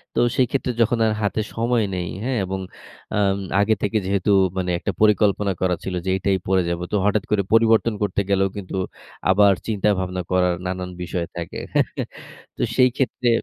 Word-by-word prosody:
তো - - +2 0.2
সেই 130 - +3
ক্ষেত্রে 130 -2 0
যখন 115 +1 +3
আর 110 - +2
হাতে 105 +1 0
সময়, 115 0 +1
নেই 90 -1 -3 0.2
হ্যা? 130 - -1
এবং 95 +1 -3 0.6
আম 100 -1 +2 0.2
আগে 105 +2 +3
থেকে 105 +2 0
যেহেতু 100 +1 +1 0.3
মানে 90 -1 -1
একটা 100 - -2
পরিকল্পনা 105 -1 +3
করা 90 -1 +2
ছিল 95 - -3
যে, - - -1
"এটাই 95 0 +1
পড়ে 95 0 +3
যাব।" 85 0 -2
তো - - 0
হঠাৎ 105 0 +2
করে 105 -2 +2
পরিবর্তন 115 0 +4
করতে 100 0 0
গেলেও 95 0 +2
কিন্তু 95 -2 -6 0.5
আবার 100 +1 +6
চিন্তা-ভাবনা 95 -4 0
করার 90 -1 +3
নানান 90 0 -3
বিষয় 85 -1 -3
থাকে। 85 -1 -5
হ্যা? - - +4 0.7
তো - - -4
সেই 130 -1 +5
ক্ষেত্রে 125 -2 0
100 Hz, 180 wpm, -22 LUFS, 95-110 Hz, 0.7 s, আবার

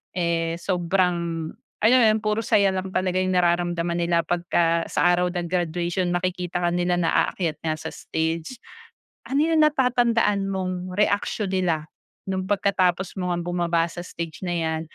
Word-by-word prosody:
eh, 165 -1 0
sobrang 175 -3 0 0.3
alam 240 +4 +6
mo 230 - +5
'yon, - - -1
puro 215 +1 0
saya 200 -4 +3
lang 185 0 -3
talaga 185 0 +1
yung 185 0 0
nararamdaman 175 -1 +1
nila 170 -1 +1
pagka 170 -1 +1
sa - - +2
araw 180 0 +2
ng 175 -1 -2
graduation, 175 +1 -1
makikita 180 -1 -2
ka 175 - +3
nila 175 0 +1
na 170 -2 +1 0.2
aakyat 170 -5 -3
nga 155 -1 0
sa 155 - -7
stage. 160 +7 -3 0.7
Ano 285 +3 +1
yung 325 -1 +3
natatandaan 235 -8 +2
mong 185 -1 -3
reaksiyon 205 -1 0
nila 170 -5 0 0.4
no'ng 190 0 -2
pagkatapos 190 -2 +1
mo 180 - -2
ngang 175 0 -3
bumaba 170 -1 +1
sa 175 - -7
stage 170 -2 -7
na - - -2
'yan, 160 -1 -1
175 Hz, 160 wpm, -24 LUFS, 170-190 Hz, 0.7 s, alam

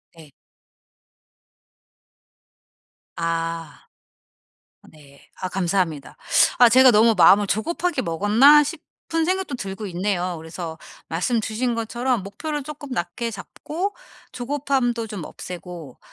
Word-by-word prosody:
네. 160 -3 -15 2.8
아. 165 -1 -3 1.1
네. 140 -3 -18 0.2
아 185 - -2
감사합니다. 175 -6 -1 0.4
아 245 -1 +7
제가 255 +2 +7
'너무 225 +1 +5
마음을 200 +3 +6
조급하게 340 - -1
먹었나?' 215 - +5
싶은 325 +1 -4
생각도 370 -5 -1
들고 195 -2 -6
있네요. 180 -1 -2
그래서 160 0 -7 0.3
말씀 220 +8 0
주신 230 +3 -2
것처럼 235 0 -1
목표를 295 +9 -5
쪼끔 290 0 -9
낮게 230 +2 -3
잡고 315 - -5 0.4
조급함도 255 -3 -1
좀 200 -7 -6
없애고 175 -7 -9
215 Hz, 225 characters per minute, -22 LUFS, 175-260 Hz, 2.8 s, 아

